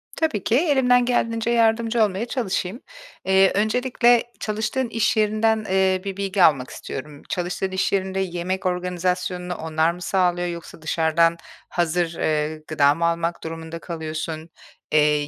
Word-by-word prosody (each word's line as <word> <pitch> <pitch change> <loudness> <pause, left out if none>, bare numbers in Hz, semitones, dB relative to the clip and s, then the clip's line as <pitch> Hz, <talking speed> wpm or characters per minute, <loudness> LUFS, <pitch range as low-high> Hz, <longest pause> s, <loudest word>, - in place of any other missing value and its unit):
Tabii 310 - -1
ki. 225 - +1
Elimden 260 -5 +3
geldiğince 230 -2 0
yardımcı 230 0 +3
olmaya 205 +2 -1
çalışayım. 225 -4 -2 0.5
Eee, 190 0 +5
öncelikle 240 +2 +3 0.2
çalıştığın 220 +5 -2
iş 225 -1 +1
yerinden, 215 +1 +2
eee, 190 0 +2
bir 195 -1 -5
bilgi 195 -1 +1
almak 135 -6 +4
istiyorum. 145 +1 -8
Çalıştığın 180 +2 -2
iş 190 - 0
yerinde 190 -1 -1
yemek 185 +1 -3
organizasyonunu 180 0 -2
onlar 160 +1 0
mı 180 +1 -10
sağlıyor 175 -1 +1
yoksa 170 -2 -8
dışarıdan 165 +1 +2 0.3
hazır, 175 0 0
eee, 155 0 -1
gıda 145 -2 +3
mı 170 - 0
almak 170 0 -1
durumunda 165 0 -6
kalıyorsun? 160 -1 -5 0.4
Eee, 150 -1 +3
185 Hz, 140 wpm, -23 LUFS, 165-215 Hz, 0.5 s, Eee